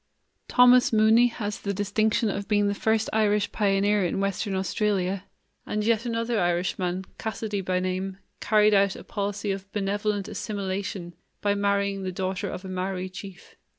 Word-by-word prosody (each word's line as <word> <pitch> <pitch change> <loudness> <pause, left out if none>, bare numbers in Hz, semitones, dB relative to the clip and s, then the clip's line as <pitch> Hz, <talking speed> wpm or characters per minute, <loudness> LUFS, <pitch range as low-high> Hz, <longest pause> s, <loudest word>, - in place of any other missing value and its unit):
Thomas 250 0 +6
Mooney 220 +2 +5
has 210 -3 -4
the 200 -1 -3
distinction 215 +3 +1
of 200 0 -4
being 205 -1 +2
the 200 - +1
first 220 +1 +1
Irish 210 -1 +2
pioneer 205 0 +2
in 175 - -1
Western 195 +1 -1
Australia; 190 0 -1 0.4
and 210 0 -2
yet 230 +1 +1
another 230 0 -1
Irishman, 180 +1 -1
Cassidy 215 -2 -3
by 185 0 0
name, 185 +1 -3 0.2
carried 210 0 +4
out 200 -1 +3
a - - -9
policy 205 0 -3
of 195 0 -6
benevolent 205 0 -1
assimilation 195 -4 -4 0.3
by 205 -1 +1
marrying 200 -1 0
the 185 -1 -3
daughter 185 0 -3
of 185 - -7
a - - -5
Maori 185 0 -3
chief. 190 0 -11
200 Hz, 155 wpm, -26 LUFS, 190-210 Hz, 0.4 s, Thomas